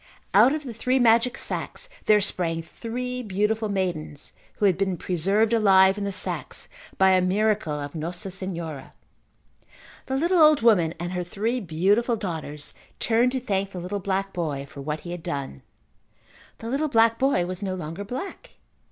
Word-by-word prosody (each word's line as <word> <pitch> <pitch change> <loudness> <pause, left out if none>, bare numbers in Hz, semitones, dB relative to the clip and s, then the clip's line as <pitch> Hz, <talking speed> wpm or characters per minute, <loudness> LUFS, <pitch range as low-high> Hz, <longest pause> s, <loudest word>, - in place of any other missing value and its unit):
Out 220 +6 +7
of 305 - -5
the 250 -4 -6
three 255 +4 0
magic 235 0 +4
sacks - - -4 0.2
there 210 -1 +5
sprang 165 -4 +1
three 250 +7 -5
beautiful 210 +1 0
maidens 170 -7 -3 0.2
who 210 - 0
had 190 -3 +4
been 190 -1 -1
preserved 195 +7 +1
alive 190 -3 +5
in 205 -1 -3
the 200 - -2
sacks 185 - -3 0.3
by 190 0 +5
a 185 0 +4
miracle 205 -2 +1
of 145 0 -6
Nossa 175 +5 -5
Senhora. 170 -7 -6 1.1
The 265 - -1
little 345 +5 +2
old 305 -5 +6
woman 175 -8 +4
and 175 +1 -4
her 180 -1 -2
three 215 +8 -2
beautiful 205 +6 +1
daughters 160 -7 -5 0.3
turned 235 +2 +2
to 260 - 0
thank 200 -6 -1
the 180 - -5
little 185 +4 -4
black 195 0 -2
boy 150 -6 -3
for 140 - -10
what 150 +2 -4
he 175 - -7
had 175 -1 -5
done. 140 - -5 1.0
The 230 - -7
little 290 +4 0
black 230 -2 +4
boy 270 -9 +2
was 185 +1 -5
no 190 -2 -2
longer 170 +2 -6
black. 320 - -7
195 Hz, 170 wpm, -25 LUFS, 175-230 Hz, 1.1 s, Out